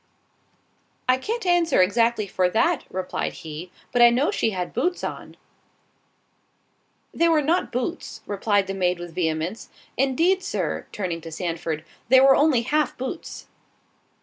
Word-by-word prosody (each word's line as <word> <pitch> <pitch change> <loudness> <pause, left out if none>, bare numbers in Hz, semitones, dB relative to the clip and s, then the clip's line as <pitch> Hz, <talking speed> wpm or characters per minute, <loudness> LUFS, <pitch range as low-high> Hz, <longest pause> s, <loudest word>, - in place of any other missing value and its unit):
"I 255 0 +4
can't 455 - -3
answer 350 - +3
exactly 225 +3 +3
for 185 -2 0
that," 280 - +1
replied 185 0 -3
he, 160 +2 -8 0.2
"but 245 - +2
I 240 - +9
know 250 +5 +1
she - - 0
had 180 -4 -4
boots 350 +9 -1
on." - - -6 1.8
"They 335 0 +3
were 310 -2 +3
not 335 +5 +1
boots," 255 +8 -4
replied 205 0 +1
the 195 - -4
maid 180 -2 0
with 175 -1 -8
vehemence—"indeed, 225 - -1
Sir, - - -3
(turning 175 -5 -3
to 165 - -9
Sandford) 165 -2 -4 0.2
they 260 +1 +7
were 270 0 +7
only 285 -6 +3
half 300 +5 0
boots." 265 +6 -6
230 Hz, 140 wpm, -24 LUFS, 180-295 Hz, 1.8 s, I